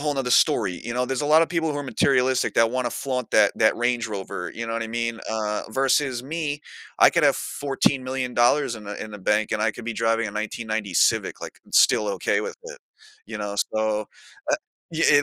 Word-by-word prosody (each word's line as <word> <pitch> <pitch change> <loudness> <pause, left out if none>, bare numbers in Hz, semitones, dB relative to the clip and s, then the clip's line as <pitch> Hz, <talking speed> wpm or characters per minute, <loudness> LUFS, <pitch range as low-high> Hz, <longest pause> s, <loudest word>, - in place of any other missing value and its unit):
whole 150 0 -1
another 135 -3 -2
story, 110 - +3
you 120 - -4
know, 125 0 0
there's 135 +2 -2
a - - -1
lot 155 +2 +6
of - - 0
people 160 -3 -1
who 145 - -3
are - - -3
materialistic 130 -1 +1
that 115 0 +4
want 130 0 -1
to - - -1
flaunt 125 -3 -3
that 105 -2 +5
that 110 - +4
Range 120 -1 0
Rover, 95 -4 -5
you 115 0 -5
know 115 - -4
what 115 - -2
I 115 - -4
mean, 115 0 -2
uh, 105 -1 -2
versus 135 0 +1
me, 150 0 -3 0.4
I - - +8
could - - +1
have - - +5
14 135 -1 -1
million 130 -1 -3
dollars 120 +2 +3
in 105 - -11
the 105 0 -6
in 110 - -8
the 105 - -8
bank 105 +2 0
and 105 - 0
I 110 - +2
could 120 - -10
be 115 - -3
driving 115 -1 +1
a - - -6
1990 110 -1 -3
Civic, - - +2
like - - -9
still 105 -1 +4
okay - - 0
with 470 - -5
it, - - -9 0.5
you - - -6
know, 105 -1 -4 0.2
so, 110 -1 0 0.5
uh, - - +4 0.4
y 165 0 -1
yeah 145 0 +6
120 Hz, 235 wpm, -24 LUFS, 110-135 Hz, 0.5 s, I